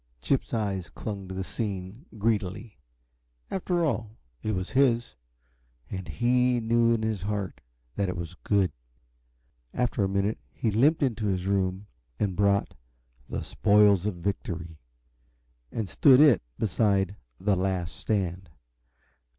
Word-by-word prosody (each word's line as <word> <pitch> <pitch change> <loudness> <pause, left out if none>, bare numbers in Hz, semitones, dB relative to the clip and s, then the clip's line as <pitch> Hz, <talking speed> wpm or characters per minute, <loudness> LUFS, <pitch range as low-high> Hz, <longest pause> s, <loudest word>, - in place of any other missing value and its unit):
Chip's 130 - 0
eyes 100 -6 -2
clung 100 -3 -6
to 95 - -6
the 95 - -2
scene 100 - -5
greedily. 105 -2 -1 0.7
After 175 -2 0
all, 110 -5 -2 0.2
it 110 -1 -1
was 95 0 -3
his 125 -3 +2 0.8
and 95 -2 -5
he 125 - +2
knew 115 +1 +3
in 115 -1 +1
his 110 -4 -1
heart 100 -1 -3 0.4
that 100 -2 +1
it 90 - -3
was 85 0 -5
good. 95 -1 +1 1.0
After 125 -4 +1
a 95 - +1
minute 100 +2 0
he 110 - -1
limped 145 +9 +3
into 115 -5 0
his 95 -2 -1
room 95 0 0 0.3
and 100 -3 0
brought 100 0 +2 0.6
"The - - -3
Spoils 105 -2 +4
of 105 - -2
Victory," 85 -3 -4 0.9
and 110 -3 -3
stood 130 - +6
it 145 -7 +7 0.2
beside 100 -2 +1 0.2
"The 100 +1 +2
Last 90 -2 -1
Stand." 95 -4 -2
100 Hz, 135 wpm, -27 LUFS, 95-115 Hz, 1.0 s, it